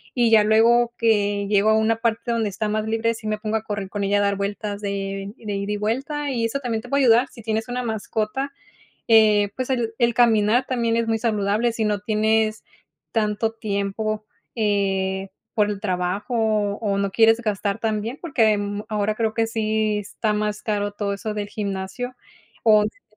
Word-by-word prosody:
y 240 Hz, -2 st, +3 dB
ya 220 Hz, -2 st, +7 dB
luego 230 Hz, +2 st, +4 dB
que 205 Hz, -3 st, +2 dB
llego 205 Hz, +1 st, +3 dB
a 220 Hz, -, +4 dB
una 220 Hz, +1 st, +2 dB
parte 230 Hz, +1 st, -1 dB
donde 225 Hz, -2 st, 0 dB
está 210 Hz, +2 st, -3 dB
más 215 Hz, 0 st, -1 dB
libre. 225 Hz, +1 st, +1 dB
Sí, 220 Hz, -1 st, -8 dB
me 215 Hz, 0 st, -1 dB
pongo 215 Hz, 0 st, -2 dB
a 220 Hz, -, -6 dB
correr 205 Hz, -3 st, -4 dB
con 205 Hz, 0 st, -3 dB
ella 200 Hz, +1 st, +2 dB
a -, -, +2 dB
dar 200 Hz, 0 st, +1 dB
vueltas 205 Hz, +1 st, -3 dB
de 195 Hz, 0 st, -4 dB
de 210 Hz, -2 st, -5 dB
ida 200 Hz, +1 st, -3 dB
y -, -, -2 dB
vuelta. 275 Hz, +8 st, -2 dB
Y 235 Hz, -3 st, 0 dB
eso 230 Hz, +5 st, -2 dB
también 235 Hz, -4 st, -2 dB
te 245 Hz, -, -11 dB
puedo 280 Hz, +2 st, +2 dB
ayudar 240 Hz, +1 st, +5 dB
si 235 Hz, -, -13 dB
tienes 220 Hz, 0 st, -1 dB
una 250 Hz, +1 st, -2 dB
mascota. 220 Hz, +4 st, -2 dB, 0.6 s
Eh, 215 Hz, -2 st, +5 dB
pues 255 Hz, -1 st, -3 dB
el 240 Hz, -3 st, 0 dB
el 235 Hz, -2 st, +2 dB
caminar 230 Hz, 0 st, +4 dB
también 235 Hz, -3 st, 0 dB
es 230 Hz, 0 st, +1 dB
muy 225 Hz, 0 st, +1 dB
saludable. 215 Hz, +1 st, +1 dB
Si 225 Hz, -1 st, -2 dB
no 210 Hz, -1 st, 0 dB
tienes 215 Hz, +1 st, +1 dB, 0.5 s
tanto 220 Hz, 0 st, 0 dB
tiempo, 215 Hz, 0 st, -3 dB, 0.3 s
eh, 195 Hz, -3 st, 0 dB, 0.3 s
por 210 Hz, -1 st, +2 dB
el 205 Hz, -1 st, -4 dB
trabajo 185 Hz, +4 st, -2 dB, 0.4 s
o 200 Hz, -3 st, -1 dB
no 200 Hz, -1 st, -1 dB
quieres 225 Hz, +1 st, +5 dB
gastar, 205 Hz, -3 st, -1 dB
también 225 Hz, +4 st, -2 dB
porque 225 Hz, -10 st, +2 dB, 0.3 s
ahora 215 Hz, -1 st, 0 dB
creo 220 Hz, 0 st, -1 dB
que 225 Hz, -1 st, +1 dB
sí 215 Hz, -1 st, 0 dB
está 210 Hz, +1 st, -2 dB
más 210 Hz, 0 st, -2 dB
caro 205 Hz, -1 st, -1 dB
todo 200 Hz, -1 st, -2 dB
eso 210 Hz, +2 st, -4 dB
del 205 Hz, -1 st, -3 dB
gimnasio 200 Hz, +5 st, -4 dB, 0.5 s
o 215 Hz, -2 st, +6 dB
tener 210 Hz, +1 st, -5 dB
215 Hz, 190 wpm, -23 LUFS, 205-230 Hz, 0.6 s, ya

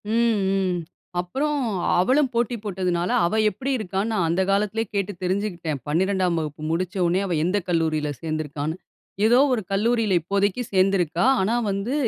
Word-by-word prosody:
ம், 230 Hz, 0 st, +2 dB, 0.2 s
ம். 185 Hz, -2 st, 0 dB, 0.4 s
அப்புறம் 275 Hz, +11 st, -1 dB, 0.4 s
அவளும் 260 Hz, +9 st, +3 dB
போட்டி 235 Hz, 0 st, 0 dB
போட்டதுனால, 180 Hz, -3 st, -1 dB, 0.2 s
அவ 215 Hz, +6 st, +1 dB
எப்டி 265 Hz, +7 st, -4 dB
இருக்கான்னு 200 Hz, 0 st, -2 dB
நான் 180 Hz, -6 st, +1 dB
அந்த 170 Hz, +3 st, +1 dB
காலத்திலேயே 210 Hz, +3 st, 0 dB
கேட்டு 200 Hz, 0 st, 0 dB
தெரிஞ்சுக்கிட்டேன். 180 Hz, -5 st, -2 dB
12ம் 180 Hz, +2 st, +1 dB
வகுப்பு 155 Hz, -1 st, -5 dB
முடிச்சோனே 180 Hz, +1 st, 0 dB
அவ 185 Hz, -, -2 dB
எந்த 180 Hz, +4 st, +1 dB
கல்லூரியில 160 Hz, -3 st, +1 dB
சேர்ந்துருக்கான்னு. 155 Hz, -1 st, -3 dB, 0.5 s
ஏதோ 235 Hz, +3 st, +5 dB, 0.2 s
ஒரு 235 Hz, -, 0 dB
கல்லூரியில 220 Hz, +1 st, +1 dB
இப்போதைக்கு 200 Hz, +6 st, 0 dB
சேர்ந்துருக்கா. 185 Hz, -3 st, +2 dB, 0.2 s
ஆனா 210 Hz, +5 st, +1 dB
வந்து 200 Hz, +6 st, -2 dB
190 Hz, 140 wpm, -23 LUFS, 170-215 Hz, 0.5 s, ஏதோ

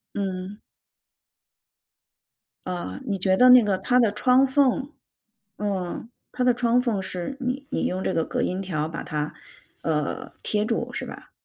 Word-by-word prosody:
嗯。 195 Hz, 0 st, -4 dB, 2.1 s
呃， 180 Hz, -1 st, -4 dB
你 205 Hz, -6 st, -1 dB
觉 190 Hz, 0 st, +3 dB
得 250 Hz, +6 st, +6 dB
那 250 Hz, 0 st, +10 dB
个 200 Hz, -3 st, +1 dB
它 250 Hz, +5 st, +2 dB
的 230 Hz, -4 st, +4 dB
窗 250 Hz, +5 st, +4 dB
缝 270 Hz, 0 st, +2 dB, 0.7 s
嗯， 200 Hz, +1 st, -3 dB, 0.2 s
它 250 Hz, -, -1 dB
的 250 Hz, 0 st, +5 dB
窗 240 Hz, 0 st, +2 dB
缝 235 Hz, -6 st, 0 dB
是 185 Hz, +7 st, -4 dB
你 260 Hz, +2 st, -3 dB
你 -, -, 0 dB
用 185 Hz, +1 st, -1 dB
这 -, -, 0 dB
个 165 Hz, -, +1 dB
隔 -, -, -2 dB
音 185 Hz, +1 st, -1 dB
条 155 Hz, -5 st, -2 dB
把 165 Hz, +1 st, -5 dB
它， 150 Hz, 0 st, -3 dB, 0.5 s
呃， 150 Hz, -2 st, -2 dB
贴 210 Hz, -1 st, 0 dB
住 -, -, -1 dB
是 -, -, -3 dB
吧？ -, -, -10 dB
205 Hz, 170 characters per minute, -25 LUFS, 185-250 Hz, 2.1 s, 那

